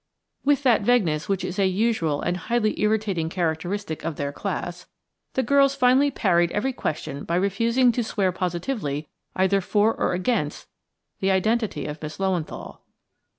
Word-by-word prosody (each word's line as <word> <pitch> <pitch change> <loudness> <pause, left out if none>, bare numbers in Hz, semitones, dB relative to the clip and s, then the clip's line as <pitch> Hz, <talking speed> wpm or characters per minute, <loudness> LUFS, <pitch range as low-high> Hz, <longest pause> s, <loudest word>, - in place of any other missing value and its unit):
With 285 0 +2
that 245 -5 +4
vagueness 200 -10 +1
which 195 -1 0
is 185 +3 -4
a 195 - +4
usual 185 -7 0
and 175 - 0
highly 215 +4 -1
irritating 210 -6 +1
characteristic 175 +1 -2
of 165 - -3
their 140 0 -3
class, 175 +1 -5 0.5
the 260 - +1
girls 275 +2 +4
finally 265 +2 +4
parried 175 -9 +2
every 260 +6 0
question 150 - -4
by 170 - -2
refusing 230 +7 +3
to 240 +1 -1
swear 200 -4 0
positively 175 - -3 0.3
either 190 +1 +2
for 210 +4 +2
or - - -1
against 180 -4 -1 0.5
the 195 - +1
identity 200 - +1
of 150 +1 -6
Miss 155 0 -6
Löwenthal. 190 -5 -3
195 Hz, 150 wpm, -24 LUFS, 170-230 Hz, 0.5 s, that